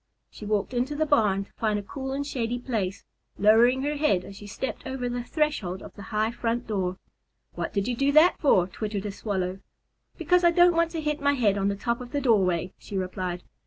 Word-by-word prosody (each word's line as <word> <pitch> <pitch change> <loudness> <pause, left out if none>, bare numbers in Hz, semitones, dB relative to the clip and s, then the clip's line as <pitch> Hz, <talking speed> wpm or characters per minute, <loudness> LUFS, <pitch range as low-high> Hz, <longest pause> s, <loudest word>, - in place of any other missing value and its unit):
She 210 - -9
walked 210 +3 -1
into 250 +4 -1
the 310 +1 +1
barn 210 -9 +2
to - - -27
find 215 -2 0
a 205 - -4
cool 265 +5 -6
and 280 +1 -2
shady 245 -4 -2
place, 220 -6 -3 0.3
lowering 235 +5 +5
her 295 +1 -1
head 200 -12 +1
as 195 - -10
she 205 - -10
stepped 225 +5 -5
over 260 -1 -3
the 245 0 -3
threshold 245 - -1
of - - -11
the 205 - -11
high 215 +1 0
front 235 0 -2
door. 185 -4 -2 0.6
"What - - -4
did 200 +1 -1
you 245 - -1
do 275 +3 +2
that 315 +4 +6
for?" 190 - +4
twittered 205 +2 -4
a 205 - -2
Swallow. 190 -2 -3 0.6
"Because 360 0 +2
I 345 - +7
don't 350 +1 +5
want 335 0 +2
to 325 - -2
hit 300 0 -2
my 285 0 +3
head 220 -7 +2
on 200 -1 0
the 200 - 0
top 235 +4 -2
of 245 +2 -10
the 290 - +1
doorway;" 190 - +2
she 200 - -6
replied. 185 -1 -3
230 Hz, 225 wpm, -26 LUFS, 200-275 Hz, 0.6 s, I